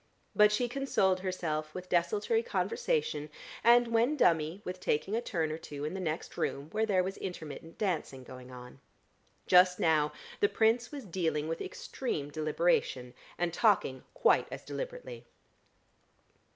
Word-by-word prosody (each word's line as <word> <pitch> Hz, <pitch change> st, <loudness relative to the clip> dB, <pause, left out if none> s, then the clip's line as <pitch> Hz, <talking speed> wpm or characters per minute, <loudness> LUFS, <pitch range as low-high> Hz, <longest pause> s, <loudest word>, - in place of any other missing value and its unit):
But 210 Hz, 0 st, +6 dB
she 240 Hz, +4 st, +1 dB
consoled 240 Hz, -8 st, +1 dB
herself 155 Hz, -5 st, -3 dB
with 185 Hz, 0 st, -6 dB
desultory 205 Hz, -, +1 dB
conversation 460 Hz, -, -1 dB, 0.3 s
and 240 Hz, +1 st, +6 dB
when 235 Hz, +6 st, +2 dB
dummy 165 Hz, -, +2 dB
with 185 Hz, 0 st, -5 dB
taking 180 Hz, +5 st, 0 dB
a 230 Hz, -, 0 dB
turn 165 Hz, -9 st, -1 dB
or 155 Hz, -, -4 dB
two 145 Hz, -2 st, -6 dB
in 155 Hz, -, -3 dB
the 190 Hz, -, -4 dB
next 160 Hz, -3 st, -4 dB
room 140 Hz, +2 st, -2 dB
where 220 Hz, +1 st, 0 dB
there 185 Hz, -3 st, +3 dB
was 190 Hz, +2 st, -4 dB
intermittent 165 Hz, -3 st, -7 dB
dancing 160 Hz, -9 st, -2 dB
going 125 Hz, 0 st, -11 dB
on. 125 Hz, 0 st, -11 dB, 0.7 s
Just 180 Hz, 0 st, +5 dB
now, 155 Hz, -2 st, +3 dB, 0.3 s
the 415 Hz, -, +3 dB
Prince 230 Hz, +2 st, +2 dB
was 280 Hz, -5 st, -7 dB
dealing 160 Hz, -5 st, -1 dB
with 165 Hz, +1 st, -3 dB
extreme 150 Hz, -, -4 dB
deliberation, 155 Hz, -5 st, 0 dB, 0.2 s
and 175 Hz, -1 st, -1 dB
talking 185 Hz, -, +2 dB
quite -, -, +3 dB
as -, -, -7 dB
deliberately. -, -, -6 dB
180 Hz, 150 wpm, -31 LUFS, 155-225 Hz, 0.7 s, But